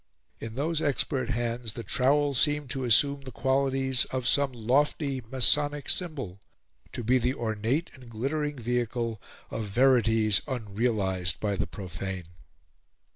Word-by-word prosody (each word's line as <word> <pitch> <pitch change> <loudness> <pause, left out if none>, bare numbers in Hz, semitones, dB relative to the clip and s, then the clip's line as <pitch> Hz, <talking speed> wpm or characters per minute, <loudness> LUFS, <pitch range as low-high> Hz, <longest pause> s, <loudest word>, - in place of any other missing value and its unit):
In 115 0 -7
those 155 +4 0
expert 135 -3 0
hands 120 -1 -2
the 115 - -6
trowel 140 +4 +2
seemed 145 0 +1
to 135 -2 -2
assume 140 +4 +4
the 130 -1 -8
qualities 135 0 +1
of 130 -2 -3
some 140 0 +3
lofty 135 +3 0
masonic 145 +3 +2
symbol 135 - -4 0.5
to 120 - -4
be 125 +3 +3
the 125 +2 0
ornate 115 +7 -1
and 125 -3 -14
glittering 145 +6 -2
vehicle 120 -2 -2 0.3
of 110 - -3
verities 110 -2 +3
unrealised 105 - -1
by 105 -2 -1
the - - -2
profane. 95 -1 -6
125 Hz, 130 wpm, -28 LUFS, 110-140 Hz, 0.5 s, assume